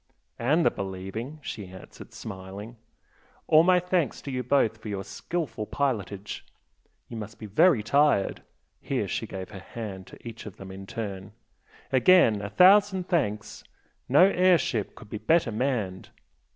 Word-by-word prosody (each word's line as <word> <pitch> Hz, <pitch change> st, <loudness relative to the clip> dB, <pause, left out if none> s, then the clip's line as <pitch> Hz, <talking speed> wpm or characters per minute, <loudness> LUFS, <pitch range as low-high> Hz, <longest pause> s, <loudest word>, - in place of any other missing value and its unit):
"And 150 Hz, +8 st, +2 dB
the -, -, +5 dB
believing!" 95 Hz, +9 st, -6 dB
she 105 Hz, -6 st, -6 dB
answered, 95 Hz, +1 st, -12 dB
smiling 95 Hz, +4 st, -8 dB, 0.7 s
"All 155 Hz, -, +6 dB
my 180 Hz, +1 st, +5 dB
thanks 180 Hz, -3 st, 0 dB
to 140 Hz, -, -5 dB
you 125 Hz, -1 st, -2 dB
both 125 Hz, -3 st, +1 dB
for 110 Hz, -, -10 dB
your 100 Hz, -1 st, -3 dB
skilful 140 Hz, -, -4 dB
pilotage. 105 Hz, -7 st, -3 dB, 0.6 s
You 115 Hz, -, -8 dB
must 110 Hz, 0 st, -7 dB
be 110 Hz, -, -8 dB
very 110 Hz, -, +4 dB
tired 140 Hz, -3 st, +2 dB, 0.2 s
" -, -, -46 dB
here -, -, 0 dB
she -, -, -3 dB
gave 95 Hz, 0 st, -7 dB
her 100 Hz, -, -8 dB
hand 95 Hz, -1 st, -7 dB
to -, -, -12 dB, 0.3 s
them 95 Hz, 0 st, -11 dB
each 95 Hz, -, -9 dB
in 95 Hz, -, -10 dB
turn 100 Hz, -4 st, -6 dB, 0.6 s
"Again 130 Hz, -, +5 dB
a 100 Hz, -, -4 dB
thousand 190 Hz, -, +5 dB
thanks! 105 Hz, -, -1 dB, 0.5 s
No 145 Hz, +7 st, +7 dB
air 185 Hz, -2 st, +5 dB
ship 115 Hz, -8 st, -2 dB
could 110 Hz, -3 st, -14 dB
be 105 Hz, -, -4 dB
better 160 Hz, -4 st, +2 dB
manned!" 110 Hz, -6 st, -2 dB
115 Hz, 155 wpm, -27 LUFS, 100-155 Hz, 0.7 s, No